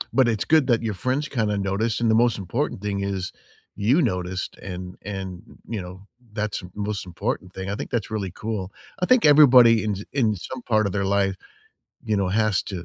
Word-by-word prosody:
But 130 -2 +5
it's 110 -3 0
good 155 -4 +4
that 120 -2 +2
your 110 -2 -1
friends 130 +9 -1
kinda 110 -7 -1
noticed, 100 +4 -1
and 115 -1 +2
the - - +4
most 120 -1 +3
important 100 - -3
thing 100 -1 -2
is 95 -2 -3 0.4
you 120 +11 +3
noticed, 90 - -2
and 90 -1 -7
and, 95 -2 -6 0.3
you 110 -4 -3
know, 90 +1 -9 0.3
that's 105 -1 -2
the 90 - -10
most 105 -1 -3
important 90 +1 -3
thing, 95 0 -6
I 100 - -2
think - - -6
that's 115 -3 -2
really 100 -4 -2
cool. 100 -1 -5 0.3
I 180 - 0
think 255 -6 +5
everybody 125 -7 +7
in 105 -2 -1 0.2
in 115 -7 +2
some 130 +8 -7
part 110 -3 +1
of 100 - -1
their 100 -1 0
life, 100 -1 +1 0.7
you 110 -2 0
know, 100 -2 +1
has 105 0 +2
to 90 -4 -6
105 Hz, 205 wpm, -24 LUFS, 95-115 Hz, 0.7 s, everybody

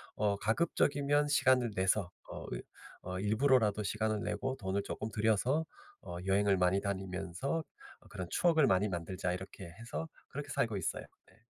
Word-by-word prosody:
어 100 -1 +1
가급적이면 145 +5 +2
시간을 130 -5 +4
내서 95 -1 +2 0.2
어 - - -6
이 - - -4 0.4
어 90 0 -5
일부러라도 110 +1 +3
시간을 110 0 -1
내고 125 +6 -2
돈을 95 0 -1
조금 110 - -4
들여서 110 +8 +2 0.4
어 85 - -7
여행을 100 0 +3
많이 90 +2 +3
다니면서 95 - -2 0.5
그런 95 -1 -5
추억을 160 -4 +4
많이 100 +3 +3
만들자.' 90 +1 -2
이렇게 95 0 -7
해서 120 +8 -4 0.2
그렇게 145 0 -6
살고 115 -4 0
있어요 95 - -2 0.3
예. - - -24
105 Hz, 340 characters per minute, -33 LUFS, 95-130 Hz, 0.5 s, 시간을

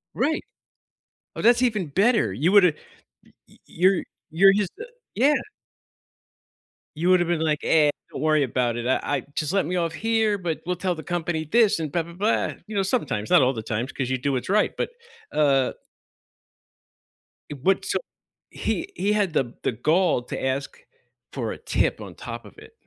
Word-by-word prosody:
Right. 295 +7 0 0.9
Oh, - - -4
that's 240 +2 +5
even 215 -7 +1
better. 205 - +2
You 150 - +1
woulda 190 -5 +6 0.5
y - - -24 0.2
y - - -21
you're 185 +2 +2 0.3
you're 195 +5 +6
just 200 -2 0
a 465 - -7 0.3
yeah. 275 +7 +4 1.6
You 170 +4 0
woulda 180 -1 +5
been 170 -1 0
like, 155 -2 0
"Eh, 155 -2 +4 0.2
don't - - -6
worry 155 -1 +3
about 120 -2 0
it. 120 - -4
I 130 - +2
I 140 -4 -1
just 155 -1 -1
let 195 -3 +1
me 180 +4 -2
off 170 -2 -1
here, 220 +2 +1
but 175 -4 -3
we'll 180 +1 -1
tell 180 +1 -1
the 160 - -7
company 175 -2 -2
this 225 -6 +4
and 155 -3 -3
blah 170 +1 0
blah 170 +1 -12
blah," 205 +6 0
you 215 - -7
know, 195 - +2
sometimes, 185 - -1
not - - +7
all 130 +1 +3
the 110 -3 -5
times, 115 +4 -3
'cause 130 -3 -3
you 130 - 0
do 140 +2 -1
what's 130 +6 -3
right, 210 +1 +3
but, - - -1 0.4
uh 135 -3 +2 1.8
Eh, - - -4
what 190 +5 +2
so - - 0 0.5
he 340 +3 -3
he 205 - +1
had 200 -5 +1
the 120 -2 0
the - - +1
gall 160 - +2
to - - -6
ask 130 +1 -2 0.5
for - - -3
a - - -6
tip - - 0
on - - -9
top - - -8
of - - -13
it? - - -14
170 Hz, 190 wpm, -24 LUFS, 140-200 Hz, 1.8 s, not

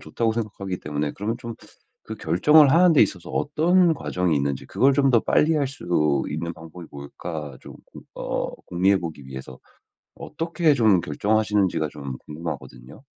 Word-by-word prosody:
좋다고 110 +9 -1
생각하기 100 -5 -4
때문에 75 0 -3
그러면 110 +4 -3
좀 115 -1 -7 0.5
그 110 - -6
결정을 140 - +4
하는 175 0 +5
데 140 - +7
있어서 95 -4 -2
어떤 170 +4 +2
과정이 90 - -1
있는지 70 -1 -1
그걸 135 +1 +2
좀 135 0 +3
더 115 -3 +4
빨리 160 +2 +2
할 145 - +1
수 140 - -11 0.5
있는 85 +2 -4
방법이 80 +1 -11
뭘까 75 +1 -7
조금 - - -13 0.3
어 - - -3
공유해 95 +3 +2
보기 80 -5 -7
위해서 65 -1 -9 0.6
어떻게 165 +1 -1
좀 110 - +3
결정하시는지가 100 -1 0
좀 70 -3 -7
궁금하거든요. 75 - -8
95 Hz, 345 characters per minute, -23 LUFS, -, 0.6 s, 데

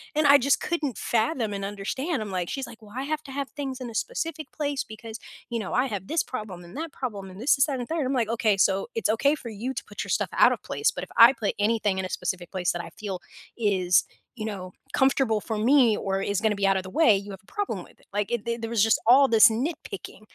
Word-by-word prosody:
And 305 - +2
I 280 0 +8
just 280 +2 +2
couldn't 300 - -2
fathom 230 -1 0
and 195 0 -3
understand, 220 - -3
I'm 205 -2 -5
like 180 -2 -2
she's 270 -1 -4
like, 230 -1 -13
"Well, 210 0 -15
I 265 - -2
have 310 +1 -2
to 275 - -10
have 280 -1 -3
things 270 -3 -5
in 245 - -5
a 225 - -10
specific 330 -11 -3
place 285 -2 -2
because, 220 +1 -9 0.3
you 235 -1 -2
know, 200 - -5
I 255 +2 +2
have 195 -4 -5
this 325 +1 +1
problem 210 -8 -6
and 175 +6 -11
that 320 0 -5
problem 205 -7 -5
and 185 +3 -10
this 275 +3 +4
is 270 - +5
that 275 -4 -3
and 245 - -4
there" 320 -3 0
I'm 260 - 0
like, 235 -4 +1
"Okay, 225 -3 +2
so 195 +2 +2
it's 225 - 0
okay 280 +7 +3
for 255 -6 -8
you 230 +5 -4
to - - -5
put - - -6
your - - -10
stuff - - +1
out - - +6
of - - -7
place, - - 0
but - - -6
if - - -10
I 235 +3 +9
put 215 -6 -2
anything 210 -2 +1
in 190 - -2
a 185 - -5
specific 180 -2 -3
place 180 -2 0
that 175 - -3
I - - -10
feel 195 -4 -4 0.4
is, 190 -5 +3 0.3
you 215 - -4
know, 185 -4 -5 0.2
comfortable 265 -5 +2
for 220 0 -3
me 240 -1 +4
or 195 -1 -1
is 200 -1 0
gonna 220 -2 +2
be 200 0 0
out 195 0 +3
of 190 - -2
the 185 - -8
way, 220 -10 +6
you 200 +1 -7
have 190 - -9
a - - -22
problem 410 -1 -3
with - - -20
it." - - -24
Like, 205 +1 -1
it 240 - 0
it 235 - +1
it 230 - -7
there 225 - -3
was 225 -3 +3
just 225 - +3
all 270 +3 +7
this 225 -3 +7
nitpicking. 260 +9 -5
225 Hz, 275 wpm, -26 LUFS, 200-270 Hz, 0.4 s, I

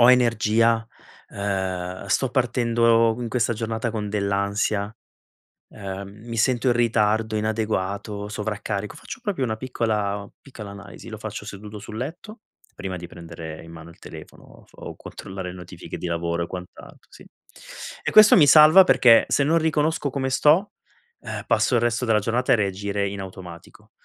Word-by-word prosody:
ho 120 +1 +8
energia? 115 -2 +3 0.4
Ehm, 95 -2 -3
sto 125 +6 +1
partendo 115 -3 +2
in 120 - -3
questa 120 -1 0
giornata 115 +1 -3
con 105 -2 -4
dell'ansia? 100 +1 -1 0.8
Ehm, 100 -1 -7 0.2
mi 115 -1 -5
sento 125 +2 +1
in 120 - +4
ritardo, 110 -2 +1
inadeguato, 105 -1 -2
sovraccarico? 105 -1 -4
Faccio - - -9
proprio 200 - -1
una 110 -1 -3
piccola 105 -5 -2
piccola 110 -7 -10
analisi. 100 +3 -11
Lo 110 - -7
faccio 110 -1 -7
seduto 105 +1 -9
sul 110 +1 -9
letto, 175 - -7 0.3
prima 95 -2 -5
di 85 0 -8
prendere 80 -2 -9
in 80 - -12
mano 85 0 -11
il 85 - -17
telefono - - -12
o - - -18
so - - -24
o - - -8
controllare 95 -1 -8
le 90 - -9
notifiche 90 0 -9
di - - -5
lavoro 85 0 -2
e - - -5
quant'altro, 90 -1 -11
sì. - - -15 0.8
E - - -1
questo 215 -1 +8
mi 150 - +6
salva 155 +6 +9
perché 115 -9 +6
se 140 - +2
non 160 +4 +3
riconosco 160 -2 0
come 130 0 -2
sto, 155 +9 +3 0.5
ehm, - - -6
passo 125 - +2
il 120 - +3
resto 120 +1 0
della 110 -2 +3
giornata 115 +4 +1
a - - +6
reagire 100 0 -1
in 100 0 -6
automatico. 90 -3 -11
110 Hz, 165 wpm, -23 LUFS, 100-120 Hz, 0.8 s, salva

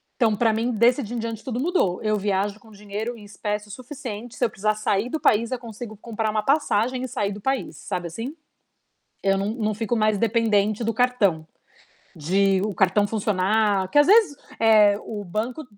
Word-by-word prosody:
Então, 225 -4 +2
pra 225 +1 +2
mim 230 +3 0
desse 240 +4 +3
dia 240 0 -6
em - - -2
diante 225 -1 -5
tudo 245 -3 -3
mudou, 275 - +1
eu 215 0 +1
viajo 200 0 -1
com 220 - -19
dinheiro 210 +3 -6
em 215 - -13
espécie 210 0 -4
o - - -9
suficiente, 245 -2 -8
se 245 - +1
eu - - 0
precisar 215 0 -1
sair 210 +1 0
do 315 - -3
país, 230 -1 +2
eu 255 - -1
consigo 225 -2 -9
comprar 220 0 -3
uma 215 0 -1
passagem 255 -3 +1
e - - -3
sair 205 -4 -2
do 205 +1 -8
país, 265 +4 -2
sabe, 180 -3 -4
assim. 230 - -6 0.9
Eu 195 0 +2
não 200 +2 -1
não 215 -3 -1
fico 225 +2 -1
mais 215 -1 +2
dependente 215 -1 +1
do 230 - 0
cartão, 205 -11 +1 0.7
de 190 +5 +1
o 210 -3 -4
cartão 190 +3 +3
funcionar, 205 -1 +1
que - - 0
às 290 +1 +6
vezes, 400 -7 +5 0.2
eh, 215 -2 +5
o 210 -2 -5
banco 220 - -4
215 Hz, 200 wpm, -24 LUFS, 205-240 Hz, 0.9 s, às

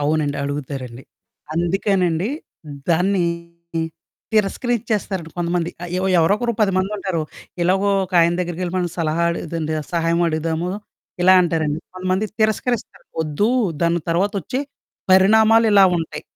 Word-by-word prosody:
అవునండి. 145 -1 0
అడుగుతారండి. 135 -3 -5 0.5
అందుకేనండి, 180 +1 +1 0.6
దాన్ని 180 +2 +2 1.1
తిరస్కరిచ్చేస్తారండి 210 -4 -1
కొంతమంది. 175 0 -1
ఆహ్, 175 - -7
ఎవ్ 190 - 0
ఎవరోకరు 205 +8 +2
10 205 -2 +3
మందుంటారు. 190 -3 -1 0.4
ఎలాగో 190 +3 +2 0.2
ఒకాయన 175 -2 +3
దగ్గరకెళ్ళి 175 0 -3
మనం 180 -1 0
సలహా 165 +1 +1
అడిగేదండి 165 -2 -3 0.2
సహాయం 170 0 +1
అడుగుదాము, 160 +2 -1 0.5
ఇలా 185 +1 +7
అంటారండి. 160 -3 0 0.2
కొంతమంది 185 +3 -1
తిరస్కరిస్తారు, 220 +2 -1 0.2
ఒద్దు 155 +7 0 0.3
దాని 170 0 +2
తర్వాత 190 +5 +1
ఒచ్చే 255 - -3 0.5
పరిణామాలు 220 +4 +6
ఇలా 200 -1 +7
ఉంటయి. 160 -2 -5
175 Hz, 110 wpm, -21 LUFS, 165-195 Hz, 1.1 s, ఇలా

